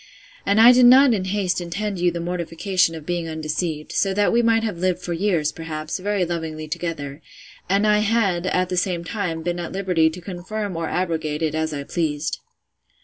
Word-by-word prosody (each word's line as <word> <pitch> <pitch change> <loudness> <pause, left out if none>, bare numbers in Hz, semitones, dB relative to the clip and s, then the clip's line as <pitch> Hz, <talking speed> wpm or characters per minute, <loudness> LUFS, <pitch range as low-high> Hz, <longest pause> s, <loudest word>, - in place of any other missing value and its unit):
And 200 +2 +3
I 235 +2 +9
did 250 0 +6
not 260 0 +7
in 190 -4 -1
haste 190 -2 -1
intend 195 +3 -3
you 175 0 +3
the 170 0 -4
mortification 175 +1 0
of 155 -2 -9
being 175 -1 -2
undeceived; 155 0 -3
so 195 -1 0
that 205 0 +2
we 235 - +4
might 225 -1 +3
have 210 -6 -3
lived 180 -1 0
for 180 -1 -4
years, 165 -4 0
perhaps, 155 0 -5
very 200 -1 0
lovingly 160 -2 -4
together; 160 -3 -5 0.5
and 200 +2 +3
I 210 0 +4
had, 200 -5 +1
at 185 0 +1
the 180 - -2
same 175 -1 0
time, 170 -4 -3
been 175 +1 -2
at 170 - -5
liberty 180 -4 +2
to 165 +3 -8
confirm 190 +2 -5
or 165 -1 -3
abrogate 160 -4 -2
it 155 -1 0
as 160 0 -1
I 140 -2 -4
pleased. 155 -1 -2
175 Hz, 200 wpm, -22 LUFS, 160-200 Hz, 0.5 s, I